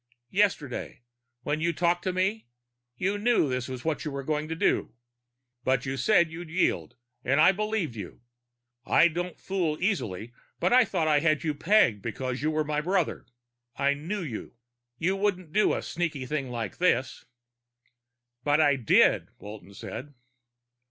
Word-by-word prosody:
"Yesterday, 180 -12 -1 0.4
when 145 +3 -1
you 170 +1 +2
talked 175 +1 +1
to 185 - +1
me, 190 - -1 0.5
you 195 +3 -1
knew 235 -7 +3
this 125 -1 -2
was 130 +1 -7
what 160 -2 -1
you 155 - -3
were 140 -1 -5
going 150 +1 -1
to 165 - -3
do. 165 - 0 0.7
But 130 0 +1
you 135 0 -2
said 170 +4 +3
you'd 165 0 -8
yield, 155 - 0 0.3
and 135 +3 +2
I 155 - +7
believed 210 - -2
you! 100 -5 -8 0.6
I 170 - +5
don't 175 +2 -4
fool 175 -6 -1
easy, 120 - -2 0.3
but - - +2
I 250 -1 +7
thought 170 -7 -1
I 150 -1 +4
had 155 0 +1
you 155 -2 0
pegged 145 - +3
because 125 +3 -4
you 155 - +1
were 155 0 0
my 150 0 -1
brother. 180 0 -1 0.5
I 140 +1 +2
knew 175 +8 -4
you. 125 -7 -7 0.4
You 185 +4 +1
wouldn't 185 -5 -1
do 210 - +3
a - - -4
sneaky 160 -6 -3
thing 140 -1 -3
like 115 -5 -4
this." 135 -9 +1 1.2
"But 145 +1 +3
I 145 -3 +4
did," 120 -5 +4
Walton 100 -1 -11
said. 145 +8 -8
155 Hz, 165 wpm, -27 LUFS, 130-180 Hz, 1.2 s, I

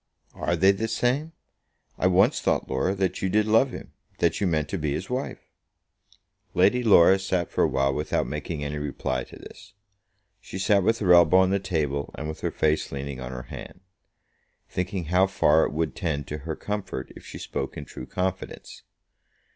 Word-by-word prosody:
"Are 85 - -1
they 95 +4 +5
the 110 +3 -2
same? 135 +8 0 0.6
I 90 - +1
once 95 +1 +3
thought, - - 0
Laura, 65 +9 0
that 95 -1 -1
you 95 - 0
did 105 +3 +2
love 110 +5 +4
him; - - -9 0.2
that - - +1
you 100 - +2
meant 80 -3 0
to 95 - -3
be 75 -2 -1
his 90 +10 -5
wife." 130 +2 -4 1.1
Lady 100 +7 +4
Laura 95 -4 +6
sat 95 -2 -1
for - - +1
a - - +4
while 70 0 +1
without 75 +2 -1
making 75 -3 -4
any 75 +1 -3
reply 65 -3 -2
to - - -14
this. - - -13 0.7
She - - -8
sat 100 +1 +3
with 115 +4 +2
her 95 -6 +4
elbow 85 +1 +6
on 95 0 +4
the 100 - +2
table 75 -7 -2
and 75 - -4
with 80 - -6
her - - 0
face 75 0 0
leaning 70 -1 -5
on 60 0 -6
her 60 -1 -6
hand, 90 - -9 0.9
thinking 90 0 -3
how 90 +4 +3
far 80 -4 +3
it - - -3
would 80 +1 -2
tend 75 -6 -2
to 75 - -4
her 80 - -1
comfort 105 -1 -5
if - - -12
she - - -9
spoke - - -5
in 75 - -6
true - - -9
confidence. 95 0 -4
90 Hz, 195 wpm, -26 LUFS, 75-95 Hz, 1.1 s, Laura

